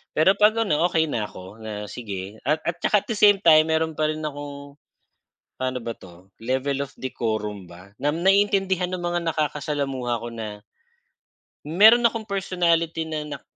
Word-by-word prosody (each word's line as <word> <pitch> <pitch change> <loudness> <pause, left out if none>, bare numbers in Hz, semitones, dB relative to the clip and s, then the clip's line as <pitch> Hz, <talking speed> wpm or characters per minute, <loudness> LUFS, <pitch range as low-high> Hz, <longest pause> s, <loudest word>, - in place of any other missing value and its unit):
Pero 160 +5 +5
'pag 210 +1 +5
ano, 165 -2 +2
okey 160 -2 +2
na 105 -3 -2
ako, 95 +4 -12
na 110 -1 -7 0.2
sige 100 -2 -7
at 155 +1 +1
at 170 0 -2
'tsaka 210 -2 +2
at - - -35
the 215 - -2
same 205 -1 +6
time, 155 -1 +6
meron 160 0 +1
pa 155 - +1
rin 155 0 -4
akong, 145 -1 -7 0.8
pa'no 130 0 -2
ba 115 - -4
'to, 90 +1 -16
level 135 +3 -1
of 140 - -10
decorum 110 -6 -3
ba 90 +3 -14
na 150 +4 -1
naiintindihan 195 -2 +3
ng 185 -1 -3
mga 175 0 0
nakakasalamuha 140 -5 -2
ko 120 - -7
na 105 -2 -7 1.0
meron 220 +9 +6
akong 230 -1 -1
personality 170 -4 0
na 155 -1 -4
nak - - -10
150 Hz, 170 wpm, -24 LUFS, 115-175 Hz, 1.0 s, same